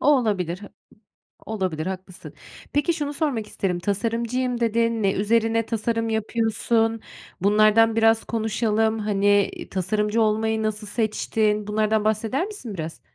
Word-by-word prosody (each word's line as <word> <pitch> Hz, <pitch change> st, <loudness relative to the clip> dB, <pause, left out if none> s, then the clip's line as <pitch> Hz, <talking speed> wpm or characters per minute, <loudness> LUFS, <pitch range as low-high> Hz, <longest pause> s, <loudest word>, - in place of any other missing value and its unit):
O -, -, -1 dB
olabilir, 185 Hz, -7 st, -1 dB
hı 205 Hz, -, -9 dB, 0.8 s
olabilir 185 Hz, -8 st, -2 dB
haklısın. 185 Hz, -1 st, -7 dB, 0.4 s
Peki, 290 Hz, +4 st, +2 dB
şunu 295 Hz, -2 st, -3 dB
sormak 275 Hz, -8 st, -1 dB
isterim, 180 Hz, -4 st, -2 dB
tasarımcıyım 235 Hz, +5 st, -1 dB
dedin. 230 Hz, -1 st, +1 dB
Ne 195 Hz, -, +2 dB
üzerine 225 Hz, +2 st, +1 dB
tasarım 230 Hz, 0 st, -1 dB
yapıyorsun? 225 Hz, +1 st, 0 dB, 0.4 s
Bunlardan 215 Hz, +3 st, +4 dB
biraz 225 Hz, 0 st, +4 dB
konuşalım, 220 Hz, 0 st, 0 dB
hani, 205 Hz, -1 st, +2 dB
iii, -, -, -9 dB
tasarımcı 210 Hz, +4 st, 0 dB
olmayı 220 Hz, 0 st, +1 dB
nasıl 215 Hz, -1 st, -3 dB
seçtin? 215 Hz, -1 st, 0 dB
Bunlardan 215 Hz, 0 st, +1 dB
bahseder 220 Hz, -, 0 dB
misin 400 Hz, -, -7 dB
biraz? 165 Hz, -3 st, -6 dB
220 Hz, 130 wpm, -23 LUFS, 205-230 Hz, 0.8 s, Bunlardan